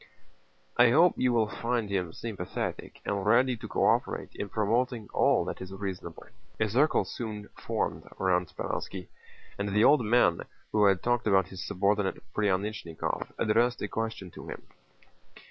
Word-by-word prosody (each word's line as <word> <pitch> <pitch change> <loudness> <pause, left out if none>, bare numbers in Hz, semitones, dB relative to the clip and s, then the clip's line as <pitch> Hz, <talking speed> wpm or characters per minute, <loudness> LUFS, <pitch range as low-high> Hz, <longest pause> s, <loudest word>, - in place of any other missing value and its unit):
"I 120 0 +7
hope 165 +8 +5
you 125 - +2
will 115 -2 +2
find 115 0 -2
him 95 -4 -1
sympathetic 95 -2 -5
and 100 -1 -1
ready 125 +5 +4
to 110 0 -8
co - - +1
operate - - +1
in 100 - -5
promoting 115 +2 0
all - - +3
that - - -5
is 95 0 -7
reasonable." 95 -4 -6 0.3
A 110 - +2
circle 135 +9 +3
soon 105 -4 -6
formed - - -3
round 90 -2 +1
Speránski, 90 +3 -5 0.5
and 100 0 -1
the 105 +2 +3
old 145 -1 +6
man 105 -6 +3 0.3
who 105 -1 +4
had 95 -2 +3
talked 120 -2 +1
about 95 -3 +3
his 95 -1 -7
subordinate 100 0 0
Pryánichnikov 100 -4 -1
addressed 120 +3 +2
a - - -1
question 110 -5 -4
to - - -11
him. - - -7
105 Hz, 155 wpm, -29 LUFS, 95-120 Hz, 0.5 s, I